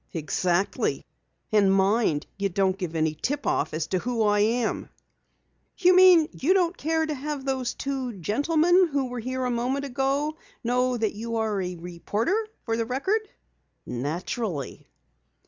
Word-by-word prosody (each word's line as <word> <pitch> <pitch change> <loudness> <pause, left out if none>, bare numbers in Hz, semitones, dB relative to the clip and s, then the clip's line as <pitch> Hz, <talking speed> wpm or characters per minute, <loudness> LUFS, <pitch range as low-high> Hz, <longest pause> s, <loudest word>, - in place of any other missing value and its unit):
"Exactly. 175 +3 0 0.5
And 205 -3 +4
mind 195 -5 +2
you 200 0 -1
don't 190 0 +1
give 180 -4 -5
any 160 -1 +1
tip 275 - -3
off - - 0
as 155 0 -2
to 185 - -1
who 235 +1 -1
I 205 -1 +3
am!" 225 +2 0 0.9
"You 365 0 +5
mean 365 -4 +7
you 350 +8 +1
don't 360 -1 +2
care 320 +1 0
to 310 - -2
have 285 0 -5
those 260 -2 -1
two 265 -3 -3
gentlemen 320 - +3
who 280 -3 -1
were 245 0 -5
here 255 +2 -3
a 250 - 0
moment 255 +4 -1
ago 275 +4 -1 0.3
know 250 +1 +1
that 220 -2 0
you 230 +2 -4
are 220 -3 0
a 180 -1 -4
reporter 205 - -2 0.2
for 225 - 0
the 230 0 -1
Record." 330 - 0 0.6
"Naturally." 155 - -4
240 Hz, 155 wpm, -26 LUFS, 195-285 Hz, 0.9 s, mean